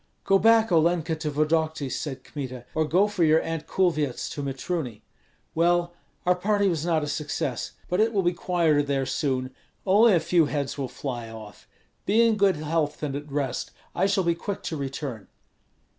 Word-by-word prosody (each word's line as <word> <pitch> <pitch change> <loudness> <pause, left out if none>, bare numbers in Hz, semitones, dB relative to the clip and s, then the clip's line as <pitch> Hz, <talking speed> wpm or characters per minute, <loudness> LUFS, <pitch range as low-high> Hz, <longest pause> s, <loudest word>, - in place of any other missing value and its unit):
"Go 195 0 +4
back, 225 0 +5
Olenka, 165 0 +2
to 155 -1 -3
Vodokty," 155 0 0
said 135 +1 -4
Kmita, 130 -4 -7
"or 155 0 +1
go 180 +6 +4
for 205 -4 0
your 160 0 +5
Aunt 165 -1 -4
Kulvyets 155 -8 0
to 145 - -5
Mitruny. 135 - -4 0.5
Well, 175 +1 +2 0.3
our 180 - +5
party 200 +2 +1
was 165 -5 0
not 165 -3 +1
a - - -3
success. 145 -3 -3
But 180 - -1
it 220 +1 +3
will 200 -4 +1
be 175 +1 +2
quieter 170 -4 +2
there 140 -2 -1
soon; 130 -1 -1 0.3
only 205 +3 +6
a - - +4
few 165 -2 +3
heads 145 -2 -2
will 140 -2 -3
fly 120 -3 -5
off. 110 -2 -11 0.4
Be 220 +4 +5
in 225 -1 +3
good 200 -2 +3
health 155 0 -2
and 140 -2 -2
at 145 0 -7
rest; 140 -3 -2 0.2
I 195 - +2
shall 195 -1 +1
be 170 -1 +2
quick 190 +4 -5
to 165 - -3
return." 135 -6 -5
160 Hz, 185 wpm, -26 LUFS, 140-180 Hz, 0.5 s, only